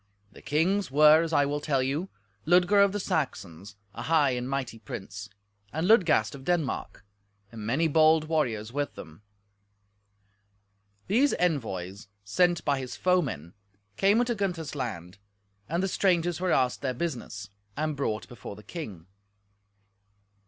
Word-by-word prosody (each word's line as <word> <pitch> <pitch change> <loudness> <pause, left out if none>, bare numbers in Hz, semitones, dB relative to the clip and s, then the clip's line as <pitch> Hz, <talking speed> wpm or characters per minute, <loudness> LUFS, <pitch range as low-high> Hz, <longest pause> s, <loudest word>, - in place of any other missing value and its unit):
The - - -15
kings 180 +5 +1
were 150 +3 +6
as 165 -1 -2
I 145 -3 +3
will 145 +1 -2
tell 140 -3 0
you: 150 +8 -2 0.4
Ludger 180 +4 +5
of 200 - +3
the 205 - -3
Saxons, 100 - -3 0.2
a 120 - -7
high 150 0 +3
and 125 0 -3
might 130 -5 -4
prince; 100 0 -7 0.4
and 160 +4 -1
Ludgast 195 -10 +4
of 135 -1 -10
Denmark, 160 -10 -2 0.5
and 110 -2 -7
many 150 +8 +2
bold 155 0 +4
warriors 120 -9 -1
with 145 0 -2
them. 80 +3 -11 1.8
These 255 +9 +2
envoys, 100 - -2 0.2
sent 175 - +1
by 140 -2 +1
his 130 -2 -6
foemen, 140 - 0 0.4
came 200 - +3
into 240 0 +1
Gunther's 180 -8 -3
land, 100 - -5 0.5
and 170 +4 0
the - - +1
strangers 175 -3 +1
were 185 -1 +1
asked 125 -1 +1
their 130 -2 -2
business, 120 - -5 0.3
and 155 0 -1
brought 110 -6 -2
before 115 -4 -9
the 105 - -14
king. 100 - -8
145 Hz, 145 wpm, -27 LUFS, 115-175 Hz, 1.8 s, were